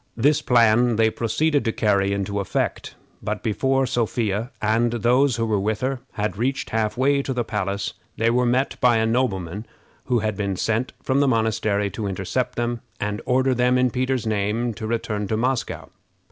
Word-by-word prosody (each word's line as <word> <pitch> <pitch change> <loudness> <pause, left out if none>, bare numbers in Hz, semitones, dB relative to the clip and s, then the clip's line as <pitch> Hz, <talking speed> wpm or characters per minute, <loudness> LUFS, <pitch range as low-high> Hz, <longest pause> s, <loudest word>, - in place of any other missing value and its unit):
This 145 +5 +3
plan 120 0 +4
they 110 0 +3
proceeded 145 +7 0
to 115 - 0
carry 100 -3 +1
into 100 0 -2
effect; 100 - -2 0.3
but - - -4
before 135 +5 +1
Sophia, 115 -3 -1
and 115 +2 +1
those 125 +3 +3
who 115 0 -1
were 110 -2 +1
with 105 +2 -1
her, 130 0 -1
had 105 -2 -2
reached 130 +4 -1
half 110 0 0
way 140 +2 +3
to 135 - -3
the 125 -1 -1
palace, 100 -2 -3 0.2
they 115 +1 +2
were 125 +1 +2
met 130 +3 0
by 125 -3 +5
a 110 - +2
nobleman 105 -5 -1 0.4
who 125 - +1
had 110 -2 -1
been 100 -1 -2
sent 115 +6 -1
from 130 +1 +1
the 140 - +3
monastery 110 -4 +1
to 105 -3 -4
intercept 95 +6 -2
them, 120 -1 -2 0.2
and 105 +1 -2
order 130 +1 +3
them, 125 +1 +2
in 125 -1 +2
Peter's 130 -1 -1
name, 110 +3 0
to 110 0 -6
return 110 -2 -2
to 110 - -1
Moscow. 125 +2 -2
115 Hz, 185 wpm, -23 LUFS, 105-125 Hz, 0.4 s, by